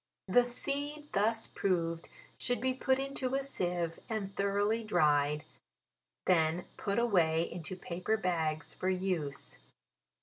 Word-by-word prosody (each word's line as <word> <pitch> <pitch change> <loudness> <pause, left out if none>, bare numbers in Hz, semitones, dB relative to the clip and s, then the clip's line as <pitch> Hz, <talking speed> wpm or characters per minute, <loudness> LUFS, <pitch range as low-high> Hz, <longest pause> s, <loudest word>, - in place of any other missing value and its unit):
The 245 +6 +5
seed 290 +4 -2
thus 225 +3 +2
proved 170 -3 -1 0.3
should 245 - 0
be 260 0 +1
put 260 0 +2
into 270 -1 -2
a 275 - 0
seive, 175 -10 -2
and 200 -3 -3
thoroughly 205 +3 +1
dried, 150 -6 +3 0.8
then 170 -1 +3
put 200 -1 -2
away 170 -9 +3
into 170 +1 -5
paper 180 +4 -1
bags, 160 -6 -1
for 185 - -1
use. 180 -7 -2
190 Hz, 125 wpm, -33 LUFS, 165-235 Hz, 0.8 s, The